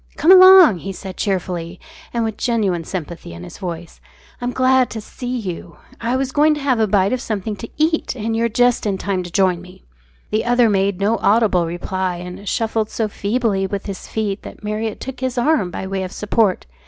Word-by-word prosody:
"Come 335 Hz, -, +5 dB
along," 370 Hz, -, +9 dB
he 195 Hz, -, -5 dB
said 190 Hz, 0 st, -8 dB
cheerfully, 180 Hz, -3 st, -3 dB, 0.3 s
and 235 Hz, -1 st, -1 dB
with 220 Hz, -2 st, -2 dB
genuine 205 Hz, -9 st, 0 dB
sympathy 170 Hz, -, -6 dB
in 85 Hz, +1 st, -9 dB
his -, -, -11 dB
voice. 175 Hz, -3 st, -7 dB, 0.4 s
"I'm 245 Hz, 0 st, -1 dB
glad 255 Hz, 0 st, +3 dB
to 225 Hz, -, -5 dB
see 245 Hz, +4 st, -5 dB
you. 175 Hz, -6 st, -6 dB, 0.2 s
I 235 Hz, +2 st, -1 dB
was 265 Hz, 0 st, -1 dB
going 300 Hz, +2 st, +3 dB
to -, -, -5 dB
have 270 Hz, -4 st, +1 dB
a 220 Hz, -, +3 dB
bite 195 Hz, +2 st, +2 dB
of 255 Hz, -, -1 dB
something 215 Hz, -2 st, -3 dB
to 230 Hz, -, -8 dB
eat, 315 Hz, -2 st, 0 dB
and 225 Hz, -1 st, -2 dB
you're 230 Hz, +1 st, +1 dB
just 245 Hz, 0 st, +2 dB
in 195 Hz, -2 st, 0 dB
time 190 Hz, -1 st, -2 dB
to 175 Hz, -1 st, -8 dB
join 185 Hz, -2 st, +2 dB
me." 180 Hz, 0 st, -15 dB, 0.5 s
The 215 Hz, -, +1 dB
other 240 Hz, -2 st, +3 dB
made 195 Hz, -1 st, +1 dB
no 210 Hz, +3 st, +1 dB
audible 200 Hz, -5 st, +3 dB
reply, 180 Hz, +2 st, -3 dB
and 180 Hz, +3 st, -7 dB
shuffled 225 Hz, -1 st, -1 dB
so 225 Hz, -, -1 dB
feebly 205 Hz, -2 st, -1 dB
with 200 Hz, 0 st, -4 dB
his 195 Hz, -2 st, -7 dB
feet 210 Hz, -2 st, -2 dB
that -, -, -11 dB
Marriott 215 Hz, +1 st, -3 dB
took 265 Hz, -1 st, -7 dB
his 260 Hz, -1 st, -3 dB
arm 245 Hz, -, +2 dB
by 190 Hz, -, -5 dB
way 190 Hz, 0 st, -3 dB
of 185 Hz, -1 st, -5 dB
support. 210 Hz, -2 st, 0 dB
210 Hz, 205 wpm, -19 LUFS, 185-240 Hz, 0.5 s, along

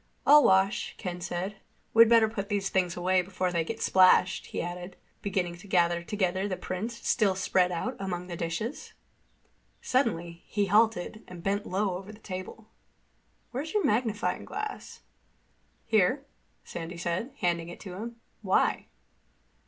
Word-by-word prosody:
"I'll 295 Hz, +1 st, +8 dB
wash," 190 Hz, +1 st, +3 dB
Ken 180 Hz, -1 st, -5 dB
said. 185 Hz, +3 st, -3 dB, 0.4 s
"We'd 230 Hz, 0 st, +8 dB
better 230 Hz, -1 st, +6 dB
put 205 Hz, -2 st, -5 dB
these 200 Hz, -2 st, 0 dB
things 180 Hz, -2 st, 0 dB
away 185 Hz, +1 st, +3 dB
before 185 Hz, 0 st, -2 dB
they 170 Hz, -2 st, +1 dB
get 225 Hz, +7 st, -4 dB
splashed," 185 Hz, 0 st, +4 dB
he -, -, -5 dB
added, 175 Hz, +1 st, -5 dB, 0.3 s
beginning 180 Hz, -3 st, -2 dB
to 200 Hz, +4 st, -14 dB
gather 175 Hz, -2 st, +2 dB
together 190 Hz, +1 st, -1 dB
the 185 Hz, -2 st, -3 dB
prints 225 Hz, +6 st, -5 dB
still 200 Hz, -4 st, +3 dB
spread 185 Hz, -1 st, +2 dB
out 235 Hz, +9 st, -3 dB
among 180 Hz, -2 st, -3 dB
the 175 Hz, -1 st, -6 dB
dishes. 170 Hz, -, -4 dB, 0.9 s
Suddenly 175 Hz, -10 st, 0 dB
he 205 Hz, -1 st, 0 dB
halted 215 Hz, 0 st, +2 dB
and 175 Hz, -2 st, -10 dB
bent 200 Hz, +2 st, -1 dB
low 190 Hz, -1 st, 0 dB
over 195 Hz, +2 st, -10 dB
the 210 Hz, -, -13 dB
table. 200 Hz, +1 st, -8 dB, 0.8 s
"Where's 290 Hz, -, -4 dB
your 415 Hz, -, +3 dB
magnifying 220 Hz, -1 st, 0 dB
glass?" 425 Hz, 0 st, -6 dB, 0.8 s
"Here," 225 Hz, +6 st, +2 dB, 0.4 s
Sandy 170 Hz, +1 st, -7 dB
said, 175 Hz, +9 st, -2 dB
handing 170 Hz, -1 st, 0 dB
it 175 Hz, -, -9 dB
to 190 Hz, -4 st, -8 dB
him. 230 Hz, +5 st, -6 dB, 0.3 s
"Why?" 190 Hz, -3 st, +1 dB
190 Hz, 150 wpm, -28 LUFS, 180-220 Hz, 0.9 s, I'll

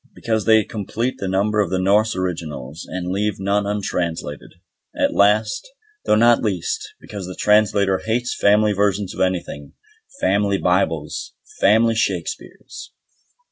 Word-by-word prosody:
Because 110 Hz, -3 st, -2 dB
they 110 Hz, -1 st, +5 dB
complete 115 Hz, +4 st, -4 dB
the 100 Hz, -, -3 dB
number 100 Hz, +3 st, +1 dB
of 100 Hz, -4 st, +1 dB
the 95 Hz, -, 0 dB
Norse 105 Hz, +3 st, +2 dB
originals, 80 Hz, -5 st, -5 dB
and 90 Hz, -1 st, -4 dB
leave 105 Hz, +2 st, -1 dB
none 100 Hz, +1 st, 0 dB
untranslated. 85 Hz, -7 st, -3 dB, 0.4 s
And -, -, 0 dB
last, 105 Hz, -, +2 dB, 0.4 s
though -, -, +3 dB
not 120 Hz, +2 st, +5 dB
least, 95 Hz, -6 st, -3 dB
because 100 Hz, -3 st, -8 dB
the 90 Hz, -, -7 dB
Translator 100 Hz, -2 st, +3 dB
hates 120 Hz, +2 st, -2 dB
family 105 Hz, +1 st, +3 dB
versions 100 Hz, -1 st, 0 dB
of -, -, -5 dB
anything, 90 Hz, -6 st, -2 dB, 0.5 s
"Family 100 Hz, 0 st, +1 dB
Bibles", 85 Hz, -5 st, -1 dB, 0.2 s
"Family 110 Hz, +3 st, +4 dB
Shakespeares". 115 Hz, -, -4 dB
100 Hz, 135 wpm, -21 LUFS, 95-105 Hz, 0.5 s, they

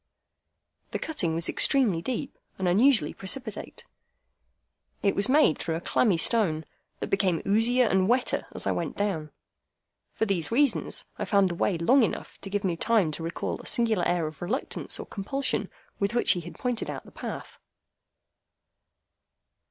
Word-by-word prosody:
The -, -, -3 dB
cutting 180 Hz, -, -2 dB
was 165 Hz, 0 st, +1 dB
extremely 225 Hz, -12 st, +3 dB
deep, 255 Hz, +6 st, -4 dB, 0.2 s
and 190 Hz, -, -1 dB
unusually 215 Hz, -, +4 dB
precipitate. 215 Hz, +2 st, -5 dB, 1.2 s
It 200 Hz, -, +3 dB
was 200 Hz, +4 st, +2 dB
made 285 Hz, -, +4 dB
through 160 Hz, 0 st, -2 dB
a -, -, -2 dB
clammy 190 Hz, +1 st, +2 dB
stone, 165 Hz, -5 st, +1 dB, 0.3 s
that -, -, -5 dB
became 190 Hz, -4 st, +1 dB
oozier 235 Hz, +5 st, +3 dB
and 190 Hz, -3 st, +2 dB
wetter 250 Hz, +2 st, +1 dB
as -, -, -3 dB
I -, -, +1 dB
went -, -, -3 dB
down. 185 Hz, -7 st, -1 dB, 0.8 s
For 220 Hz, -, 0 dB
these 195 Hz, -4 st, 0 dB
reasons, 275 Hz, +2 st, +2 dB
I -, -, -1 dB
found 200 Hz, -3 st, +3 dB
the -, -, -3 dB
way 175 Hz, +1 st, 0 dB
long 245 Hz, +12 st, +4 dB
enough 225 Hz, -, -3 dB
to 195 Hz, -, -7 dB
give 205 Hz, +1 st, -2 dB
me 180 Hz, -3 st, 0 dB
time 200 Hz, -3 st, +2 dB
to 155 Hz, -, -6 dB
recall 165 Hz, +1 st, -4 dB
a -, -, -9 dB
singular 225 Hz, -6 st, +2 dB
air 175 Hz, -2 st, +1 dB
of 155 Hz, -2 st, -7 dB
reluctance 215 Hz, +10 st, -3 dB
or -, -, -5 dB
compulsion 265 Hz, +8 st, -2 dB, 0.3 s
with 200 Hz, +3 st, -1 dB
which 240 Hz, -, +3 dB
he 180 Hz, -, +1 dB
had 170 Hz, +1 st, -10 dB
pointed 245 Hz, -2 st, -2 dB
out -, -, -6 dB
the -, -, -14 dB
path. -, -, -7 dB
200 Hz, 165 wpm, -27 LUFS, 170-240 Hz, 1.2 s, unusually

